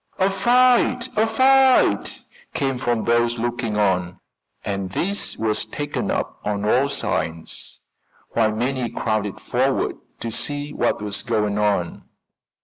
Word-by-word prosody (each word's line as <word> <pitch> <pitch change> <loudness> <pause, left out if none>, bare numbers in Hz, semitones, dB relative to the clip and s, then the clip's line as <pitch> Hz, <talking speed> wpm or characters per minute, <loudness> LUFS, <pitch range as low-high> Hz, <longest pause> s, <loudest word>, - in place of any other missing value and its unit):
"A 190 +1 +2
fight! 245 +4 +3
A 220 +1 +3
fight!" 260 +3 +3 0.3
came 135 -2 -1
from 120 -3 0
those 120 0 +2
looking 120 -2 -2
on, 90 -3 0 0.5
and 100 -2 -2
this 195 - -2
was 110 -1 0
taken 145 0 -4
up - - -2
on 105 0 -2
all 130 +6 +3
sides, 85 -12 -4 0.5
while 110 -2 +2
many 125 +2 -1
crowded 110 -3 -2
forward - - 0 0.2
to 115 - -3
see 145 +5 -3
what - - 0
was 105 -1 -3
going 105 -3 0
on. 100 -5 0
120 Hz, 130 wpm, -22 LUFS, 105-150 Hz, 0.5 s, fight